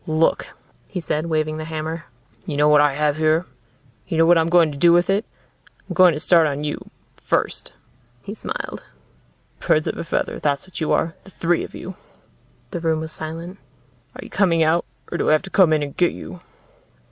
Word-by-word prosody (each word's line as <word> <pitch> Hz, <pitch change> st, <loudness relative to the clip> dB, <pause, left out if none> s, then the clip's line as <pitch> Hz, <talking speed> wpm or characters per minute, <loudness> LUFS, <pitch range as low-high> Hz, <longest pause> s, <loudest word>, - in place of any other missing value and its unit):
"Look," 155 Hz, +1 st, +1 dB, 0.4 s
he 185 Hz, -, -5 dB
said, 155 Hz, -1 st, -2 dB
waving 155 Hz, -1 st, -1 dB
the 155 Hz, -, -5 dB
hammer. 160 Hz, +1 st, -5 dB, 0.4 s
"You 150 Hz, -4 st, -3 dB
know 150 Hz, +1 st, +4 dB
what 150 Hz, -1 st, +6 dB
I 145 Hz, -2 st, +2 dB
have 150 Hz, 0 st, +1 dB
here? 160 Hz, +2 st, +2 dB, 0.6 s
You 165 Hz, -, -2 dB
know 165 Hz, -, +5 dB
what 175 Hz, +1 st, +6 dB
I'm 165 Hz, +1 st, +1 dB
going 170 Hz, -3 st, +4 dB
to 140 Hz, -, -8 dB
do 170 Hz, +2 st, +6 dB
with 175 Hz, +2 st, +3 dB
it? 200 Hz, +3 st, 0 dB, 0.6 s
I'm -, -, -5 dB
going 180 Hz, -2 st, +6 dB
to -, -, -4 dB
start 165 Hz, -1 st, +4 dB
on 145 Hz, 0 st, -3 dB
you 150 Hz, -, -3 dB, 0.4 s
first." -, -, -2 dB, 0.5 s
He 205 Hz, -, -6 dB
smiled. -, -, -6 dB, 0.8 s
"Birds 155 Hz, -, +2 dB
of -, -, -3 dB
a -, -, -2 dB
feather, 165 Hz, -, -2 dB
that's 140 Hz, -2 st, -1 dB
what 185 Hz, -2 st, -9 dB
you 155 Hz, -, 0 dB
are 165 Hz, -, +1 dB
the -, -, -14 dB
three 175 Hz, -2 st, 0 dB
of -, -, -9 dB
you." 185 Hz, -, -7 dB, 0.8 s
The 175 Hz, -, -3 dB
room 160 Hz, -1 st, 0 dB
was 160 Hz, 0 st, -6 dB
silent. 165 Hz, +5 st, -7 dB, 0.6 s
"Are -, -, -8 dB
you -, -, -12 dB
coming 170 Hz, -5 st, +3 dB
out? 160 Hz, +2 st, +2 dB, 0.3 s
Or 170 Hz, -, -3 dB
do -, -, +1 dB
I -, -, +5 dB
have 155 Hz, -, +2 dB
to 195 Hz, -, -10 dB
come 185 Hz, -5 st, +5 dB
in 155 Hz, -1 st, +2 dB
and 140 Hz, -1 st, -6 dB
get 175 Hz, -1 st, +2 dB
you?" 180 Hz, -, -9 dB
160 Hz, 210 wpm, -21 LUFS, 155-175 Hz, 0.8 s, what